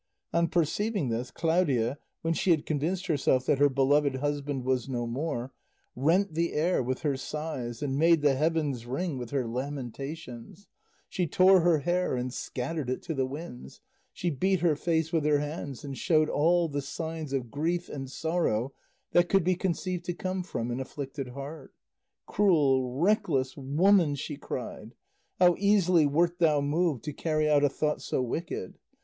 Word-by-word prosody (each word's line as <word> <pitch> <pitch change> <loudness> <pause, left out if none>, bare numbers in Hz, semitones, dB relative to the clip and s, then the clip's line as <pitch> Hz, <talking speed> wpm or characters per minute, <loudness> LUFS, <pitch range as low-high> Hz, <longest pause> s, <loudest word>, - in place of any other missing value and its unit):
On 170 0 +3
perceiving 175 - 0
this, 120 +2 -2
Claudia, 145 -7 +1 0.2
when 165 0 +1
she 185 - -1
had 160 -4 +3
convinced 165 +5 -1
herself 135 -6 +1
that 140 - +2
her 145 0 +5
beloved 140 +1 +2
husband 145 -1 -2
was 130 -1 0
no 120 -2 -2
more, 125 0 -3 0.4
rent 165 +8 +2
the 170 +1 0
air 170 +2 +1
with 130 +1 -2
her 145 -3 +1
sighs 135 -4 -5
and 135 -1 -1
made 165 -1 +4
the 145 -2 +5
heavens 145 -4 0
ring 140 +2 -2
with 120 -2 -6
her 135 -3 -1
lamentations; 135 - -6 0.4
she 180 -2 -1
tore 185 +4 +6
her 165 -3 +3
hair 175 -1 0
and 125 0 -3
scattered 135 +2 -4
it 130 - -3
to 165 - -3
the 135 -3 0
winds, 135 - -8 0.3
she 175 - -2
beat 185 +5 +1
her 170 -3 +3
face 160 +1 -1
with 160 -3 +2
her 150 -1 +3
hands 145 -3 -5
and 140 -2 -6
showed 155 -3 +3
all 170 +3 +3
the 145 -2 -3
signs 160 +1 -5
of 125 -4 -2
grief 170 +4 -1
and 135 -2 -6
sorrow 140 -6 -1 0.4
that 175 0 +3
could 195 -2 +3
be 185 +2 +2
conceived 180 0 -2
to 175 - -3
come 185 +1 -3
from 120 -9 -4
an 120 - -3
afflicted 135 0 -5
heart. 140 +3 -9 0.5
"Cruel, 140 -10 +3
reckless 150 -6 +1
woman!" 150 +3 +3
she 145 +2 -5
cried, 125 -4 -7 0.4
"how 180 -1 +6
easily 185 -6 +4
wert 170 +4 +1
thou 155 -4 +4
moved 145 -1 0
to 150 - -4
carry 155 0 0
out 145 -1 +4
a 145 - +5
thought 150 +2 -1
so - - -2
wicked! 125 - -4
150 Hz, 170 wpm, -28 LUFS, 135-170 Hz, 0.5 s, tore